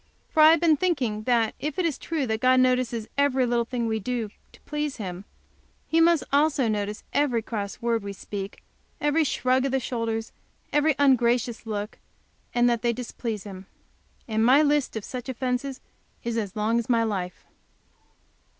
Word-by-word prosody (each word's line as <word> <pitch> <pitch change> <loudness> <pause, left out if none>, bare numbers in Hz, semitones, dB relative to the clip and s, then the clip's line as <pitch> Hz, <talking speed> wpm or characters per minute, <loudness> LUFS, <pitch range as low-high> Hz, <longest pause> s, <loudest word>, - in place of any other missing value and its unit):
For 315 - +3
I 310 - +9
have 325 0 +5
been 320 -2 +4
thinking 255 -12 -1
that, 230 -3 +2
if 300 0 -4
it 365 - +1
is 310 -5 -1
true 320 -5 -2
that 220 -2 -1
God 255 0 +5
notices 250 -3 +1
every 265 -2 +3
little 240 -1 +1
thing 240 0 -2
we 220 -1 -1
do 230 -1 -3 0.2
to - - -18
please 295 -1 -3
Him, 190 -3 -6 0.6
He 325 +1 +3
must 335 -1 +4
also 285 -3 +3
notice 210 -1 -2
every 265 -6 +1
cross 210 0 -5
word 230 -1 +1
we 200 0 -5
speak, 200 0 -7 0.4
every 295 +2 +2
shrug 255 -2 +1
of 275 - -1
the 265 - +2
shoulders, 230 -2 -3 0.4
every 295 0 +3
ungracious 245 -4 +2
look, 210 0 -4 0.5
and 240 0 +3
that 235 -2 +1
they 235 -1 +1
displease 230 -3 -5
Him. 195 -2 -9 0.6
And 220 -1 +1
my 265 +6 +6
list 295 -4 +1
of 220 - -4
such 250 0 -6
offences 260 +1 -2 0.4
is 235 -1 -2
as 210 -3 -3
long 220 +2 +1
as 235 - -5
my 230 -2 +3
life. 190 -5 -3
240 Hz, 175 wpm, -26 LUFS, 220-275 Hz, 0.6 s, I